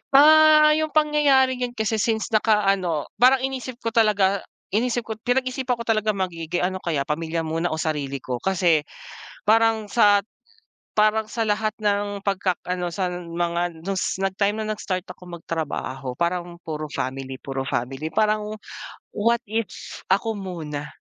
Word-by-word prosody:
Ah, 305 +1 +8
yung 310 +1 +2
pangyayaring 285 -4 +3
yun 240 - -13
kasi 220 -1 -1
since 220 0 0
naka-ano 195 -7 +1
parang 260 +1 +5
inisip 260 -1 -3
ko 230 - -1
talaga, 205 -3 +3 0.3
inisip 235 +3 0
ko, 220 -1 -6
pinag-isipan 255 +1 0
ko 235 - -6
talaga 215 -2 +1
maigi, 175 -4 -3 0.2
ano 185 +1 -1
kaya 155 -6 -1
pamilya 165 +3 -2
muna 165 +2 -1
o 155 - -2
sarili 150 -4 -2
ko. 125 -1 -3
Kasi 175 -3 +2 0.6
parang 220 -1 +3
sa 205 -3 +5 0.8
parang 215 +1 +3
sa 230 -1 -1
lahat 215 0 0
ng 205 -1 -1
pagkak 195 -2 0
ano 180 -1 -2
sa 185 +2 -2
mga 170 -1 -3
dun 195 - -1
s 185 - -1
nag-time 195 +2 0
na 215 - -1
nag-start 185 -3 -4
akong 180 -1 -10
magtrabaho 135 -6 -4
parang 175 0 -2
puro 155 -1 -4
family, 130 -1 -4
puro 135 0 -5
family 135 +3 -3
parang, 215 +2 0 0.6
what 235 +3 +1
if 220 -2 -2 0.4
ako 200 +4 +2
muna. 165 -8 -6
200 Hz, 150 wpm, -23 LUFS, 170-225 Hz, 0.8 s, Ah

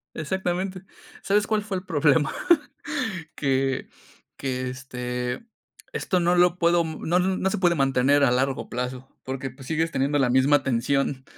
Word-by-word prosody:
Exactamente. 185 +3 -2 0.4
¿Sabes 205 +1 +2
cuál 215 -1 +1
fue 200 -3 -3
el 180 - -9
problema? 150 -2 +2 1.0
que 135 -1 0 0.5
que, 130 -1 -3
este, 125 - -4 0.5
esto 185 - 0
no 175 +1 +3
lo 180 0 +4
puedo, 170 0 +3
no 160 +2 -2
n 185 +1 +1
no 190 - 0
se - - -1
puede 175 -2 +3
mantener 135 0 +3
a 120 - +4
largo 135 +2 0
plazo, 125 +1 -4 0.2
porque 135 0 -4
pues 130 +1 -13
sigues 160 +2 0
teniendo 140 +2 +1
la 130 -3 +2
misma 135 +2 +4
tensión. 130 +2 0
140 Hz, 155 wpm, -25 LUFS, 130-175 Hz, 1.0 s, lo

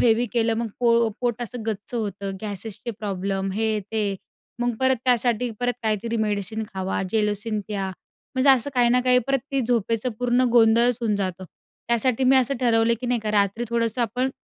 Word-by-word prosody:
Heavy 235 +1 +3
केलं, 230 -2 +2
मग 235 +1 -1
पो 235 -1 +4
पोट 240 -1 -1
असं 240 0 -6
गच्च 215 +1 -4
होतं, 200 -3 -3
गॅसेसचे 215 +2 -4
प्रॉब्लेम, 195 -1 -2
हे, 220 +1 0
ते. 205 0 -2 0.5
मग 245 -1 0
परत 260 0 +3
त्यासाठी 245 -1 +2
काहीतरी 230 -2 -1
मेडिसिन 215 0 -1
खावा, 190 0 -2
जेलोसिन 210 0 0
प्या, 200 -2 -3 0.5
म्हणजे 260 +2 +5
असं 265 +1 +3
काही 245 -1 +4
ना 250 +1 +3
काही. 250 0 +5
परत 275 0 +2
ते 275 - +2
झोपेचं 230 0 0
पूर्ण 245 0 +2
गोंधळच 235 0 +4
होऊन 225 -3 0
जातो. 185 -2 -3 0.4
त्यासाठी 235 +2 +1
मी 265 +1 +5
असं 260 +1 +2
ठरवलं, 230 -1 +3
की 250 - -4
नाही 245 -1 0
का, 215 -1 -2
रात्री 205 +2 +1
थोडंसं 230 0 0
आपण 250 +4 -1
230 Hz, 175 wpm, -24 LUFS, 210-245 Hz, 0.5 s, म्हणजे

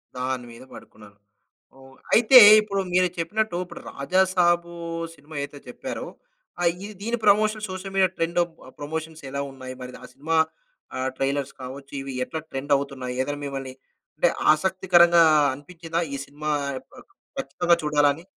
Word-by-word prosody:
దానిమీద 125 -1 -4
పడుకున్నాను. 105 -1 -14 0.6
అవన్ 135 0 -17 0.2
అయితే 240 +3 +7 0.2
ఇప్పుడు 200 -2 -2
మీరు 185 0 +4
చెప్పినట్టు, 185 +3 -1
ఇప్పుడు - - -11
'రాజాసాబు' 175 +1 +1 0.4
సినిమా 150 +1 -14
అయితే 145 0 -8
చెప్పారో 260 - -6 0.5
ఆహ్, 175 - +4
ఇది 210 +1 -7
దీని 230 +3 -1
promotion 215 +1 +3
social 190 +1 -6
media 190 -1 +5
trend 165 +1 -2 0.4
promotions 160 +2 -5
ఎలా 140 +1 -3
ఉన్నాయి? 130 -1 -9
మరి 125 - -7
ఆ - - -8
సినిమా 160 +3 -1 0.6
ఆహ్, 130 0 -1
ట్రైలర్స్ 140 0 -1
కావచ్చు, 135 +2 -9
ఇవి 135 0 -6
ఎట్లా 160 - -5
ట్రెండ్ 135 +2 -5
అవుతున్నాయి? 135 -3 -5
ఏదైనా 145 +2 -4
మిమ్మల్ని 135 -2 -5 0.4
అంటే - - +4 0.2
ఆసక్తికరంగా 175 0 +4 0.3
అనిపించిందా? 165 +3 -5
ఈ - - -2
సినిమా 150 +2 -6 0.5
ఆహ్, - - -14 0.4
కచ్చితంగా 170 +5 +1
చూడాలని. 150 +1 +2
155 Hz, 135 wpm, -24 LUFS, 135-180 Hz, 0.6 s, అయితే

